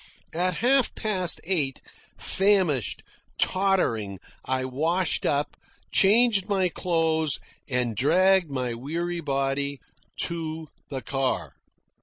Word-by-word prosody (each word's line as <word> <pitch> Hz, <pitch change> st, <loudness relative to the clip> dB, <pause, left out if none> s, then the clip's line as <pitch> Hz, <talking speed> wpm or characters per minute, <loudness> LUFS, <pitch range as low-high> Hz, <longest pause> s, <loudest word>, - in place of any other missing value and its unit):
At 180 Hz, +2 st, 0 dB
half 265 Hz, -1 st, +3 dB
past 185 Hz, -6 st, 0 dB
eight, 155 Hz, -7 st, -1 dB, 0.4 s
famished, 190 Hz, -, +1 dB, 0.4 s
tottering, 150 Hz, -, +1 dB, 0.3 s
I 130 Hz, 0 st, -1 dB
washed 160 Hz, +7 st, 0 dB
up, 145 Hz, +1 st, 0 dB, 0.4 s
changed 210 Hz, 0 st, +4 dB
my 190 Hz, -3 st, +2 dB
clothes, 160 Hz, -4 st, 0 dB, 0.3 s
and 125 Hz, -3 st, -1 dB
dragged 180 Hz, -, +3 dB
my 130 Hz, -3 st, -2 dB
weary 170 Hz, +8 st, -3 dB
body 140 Hz, -1 st, -1 dB, 0.4 s
to 160 Hz, -2 st, -3 dB, 0.2 s
the 135 Hz, -2 st, -5 dB
car. 135 Hz, -1 st, -1 dB
160 Hz, 100 wpm, -26 LUFS, 135-185 Hz, 0.4 s, changed